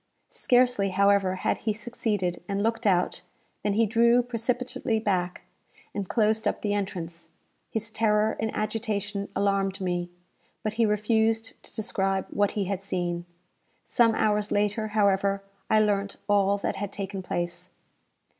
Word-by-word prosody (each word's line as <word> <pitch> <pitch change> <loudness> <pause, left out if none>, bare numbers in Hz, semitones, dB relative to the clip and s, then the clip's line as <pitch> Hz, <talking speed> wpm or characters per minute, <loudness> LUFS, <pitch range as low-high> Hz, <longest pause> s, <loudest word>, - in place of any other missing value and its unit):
Scarcely, 245 -5 +3
however, 195 0 +3
had 185 - -1
he 215 - 0
succeeded, 210 -5 -2
and 200 0 0
looked 225 0 0
out, 180 -2 +2 0.4
than 205 - 0
he 225 +2 +3
drew 235 +2 +4
precipitately 245 0 -1
back, 185 -4 -1 0.5
and 200 -3 -4
closed 220 -1 +2
up - - -1
the 205 -1 +1
entrance. 170 -5 -4 0.4
His 225 0 -2
terror 215 0 +2
and 220 - 0
agitation 210 -2 -2
alarmed 195 0 +1
me; 175 -2 -2 0.5
but 215 - -1
he 225 0 +2
refused 220 +1 +1
to - - -13
describe 195 -3 0
what 205 -1 +1
he 200 - +1
had 195 0 -2
seen. 175 -3 -2 0.6
Some 230 -2 +3
hours 210 -1 +1
later, 210 +1 +1
however, 200 -2 +2 0.3
I 215 - +5
learnt 200 -2 +1
all 200 -1 +3
that 200 - -2
had 205 -1 -4
taken 195 -1 -4
place. 175 0 -3
205 Hz, 145 wpm, -27 LUFS, 195-220 Hz, 0.6 s, I